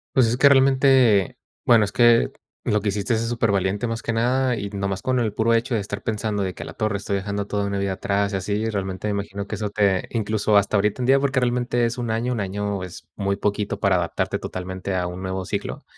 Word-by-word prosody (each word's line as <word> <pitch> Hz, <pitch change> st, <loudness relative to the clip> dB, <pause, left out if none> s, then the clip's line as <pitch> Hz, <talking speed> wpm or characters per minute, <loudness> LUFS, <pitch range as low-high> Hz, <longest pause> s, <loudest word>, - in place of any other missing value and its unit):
Pues, 130 Hz, -3 st, +5 dB
es 120 Hz, +2 st, 0 dB
que, 140 Hz, -, +6 dB
realmente, 135 Hz, -5 st, +5 dB
eh, 95 Hz, -, -9 dB, 0.3 s
bueno, 115 Hz, -3 st, +6 dB
es 100 Hz, -, -6 dB
que 120 Hz, 0 st, +4 dB, 0.3 s
lo 105 Hz, -1 st, +1 dB
que 105 Hz, -, 0 dB
hiciste 105 Hz, +4 st, -1 dB
es 110 Hz, -, -1 dB
súper 115 Hz, -1 st, 0 dB
valiente, 100 Hz, +3 st, 0 dB
más 115 Hz, 0 st, -4 dB
que 115 Hz, -, -2 dB
nada. 125 Hz, +2 st, +1 dB
Y 100 Hz, -2 st, -4 dB
nomás 100 Hz, -1 st, -3 dB
con 130 Hz, -1 st, 0 dB
el 110 Hz, -4 st, -1 dB
puro 115 Hz, +2 st, +2 dB
hecho 120 Hz, +3 st, 0 dB
de 110 Hz, -, +1 dB
estar 100 Hz, +1 st, -6 dB
pensando 105 Hz, -2 st, -2 dB
de 95 Hz, -, -3 dB
que: -, -, -10 dB
"A -, -, -6 dB
la -, -, -8 dB
torre, 110 Hz, -2 st, -1 dB
estoy 100 Hz, 0 st, -3 dB
dejando 100 Hz, +1 st, -3 dB
toda 100 Hz, 0 st, -1 dB
una 100 Hz, 0 st, -2 dB
vida 100 Hz, -1 st, -1 dB
atrás 100 Hz, +1 st, -1 dB
y -, -, -2 dB
así", 95 Hz, +2 st, -2 dB
y 110 Hz, +2 st, -1 dB
realmente 95 Hz, -1 st, -3 dB
me -, -, 0 dB
imagino 100 Hz, 0 st, -4 dB
que 110 Hz, -, -4 dB
eso 105 Hz, 0 st, -4 dB
te 100 Hz, -3 st, +1 dB
incluso 110 Hz, -1 st, 0 dB
hasta 100 Hz, +1 st, +3 dB
ahorita 105 Hz, +4 st, 0 dB
en 125 Hz, -, -1 dB
día, 135 Hz, +1 st, +5 dB
porque 135 Hz, -1 st, +1 dB
realmente 120 Hz, -1 st, +1 dB
es 115 Hz, +1 st, -2 dB
un 120 Hz, -2 st, -2 dB
año, 115 Hz, +3 st, -1 dB
un 115 Hz, -, -2 dB
año 100 Hz, 0 st, -3 dB
es 85 Hz, -3 st, -10 dB
muy 100 Hz, -1 st, -1 dB
poquito 105 Hz, -1 st, -2 dB
para 100 Hz, -2 st, +3 dB
adaptarte 85 Hz, -2 st, -1 dB
totalmente 95 Hz, +1 st, -5 dB
a 90 Hz, -1 st, -1 dB
un 90 Hz, +1 st, -7 dB
nuevo 95 Hz, 0 st, -3 dB
ciclo. -, -, -4 dB
105 Hz, 255 wpm, -23 LUFS, 100-115 Hz, 0.3 s, que